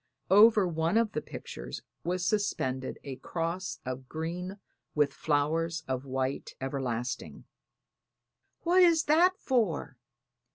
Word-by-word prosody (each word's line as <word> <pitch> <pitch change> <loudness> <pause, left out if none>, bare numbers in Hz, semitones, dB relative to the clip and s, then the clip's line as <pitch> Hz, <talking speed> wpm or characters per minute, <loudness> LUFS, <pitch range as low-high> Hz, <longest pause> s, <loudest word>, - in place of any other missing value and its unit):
Over 210 -1 +7
one 165 +3 +1
of 230 -2 +2
the 150 - -2
pictures - - -8 0.2
was 180 +1 -1
suspended 130 -12 -1
a 135 -2 -6
cross 170 +6 -3
of 130 0 -5
green 175 +4 -4 0.4
with 150 -2 +3
flowers 160 +2 0
of 130 0 -2
white 130 0 -2
everlasting. 130 -3 -3 1.2
"What 355 +2 +4
is 335 -2 +6
that 350 +5 +4
for?" 200 - 0
165 Hz, 115 wpm, -30 LUFS, 135-205 Hz, 1.2 s, Over